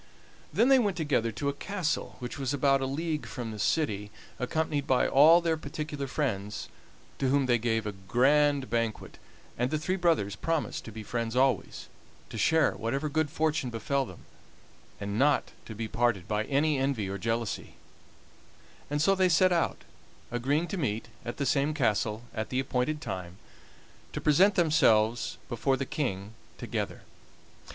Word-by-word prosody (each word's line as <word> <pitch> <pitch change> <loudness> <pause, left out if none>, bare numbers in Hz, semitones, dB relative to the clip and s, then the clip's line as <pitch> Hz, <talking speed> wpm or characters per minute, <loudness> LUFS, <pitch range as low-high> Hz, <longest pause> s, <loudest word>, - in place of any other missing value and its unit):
Then 225 - +3
they 270 -1 +7
went 205 -6 0
together 140 -8 +1
to 140 - -3
a - - -1
castle 175 +1 -3
which 125 +3 -6
was 135 +1 -1
about 135 0 +3
a 135 - -1
league 155 +2 -2
from 120 -4 -5
the 105 - -7
city, 105 -5 0 0.3
accompanied 145 +2 -1
by 130 -1 +3
all 160 +5 +7
their 165 -1 +1
particular 145 -1 -5
friends, 105 -8 -3 0.5
to 135 - +1
whom 140 0 +3
they 120 -2 +3
gave 115 -1 0
a 105 - -2
grand 135 +8 +2
banquet, 115 0 -2 0.4
and 125 +1 +1
the 155 - 0
three 185 +5 -1
brothers 160 - +1
promised 165 +7 -2
to 115 - -8
be 110 0 -7
friends 115 +1 -3
always, 130 -6 +1 0.4
to - - -6
share 160 +7 +4
whatever 135 +7 -2
good 155 0 0
fortune 155 -3 0
befell 130 +4 -1
them, 90 - -13 0.7
and 100 +1 -3
not 145 +1 +3 0.2
to 110 - -7
be 110 +1 -3
parted 115 -5 0
by 105 0 0
any 145 +2 +1
envy 135 -7 0
or 100 +1 -4
jealousy; 115 +1 -3 1.1
and 145 +1 0
so 195 - +5
they 185 -1 +3
set 185 +2 +4
out, 170 - 0 0.5
agreeing 140 +8 0
to 195 - -4
meet 110 - -2
at 120 - -5
the 140 - -1
same 145 +2 +1
castle 110 -4 0
at 110 -1 -3
the 130 - -1
appointed 135 +3 -1
time, 90 - -6 0.8
to - - -3
present 185 +7 +4
themselves 120 - +3
before 130 +3 0
the 135 - -2
King 105 -8 -3 0.2
together. - - -4
135 Hz, 165 wpm, -29 LUFS, 115-155 Hz, 1.1 s, they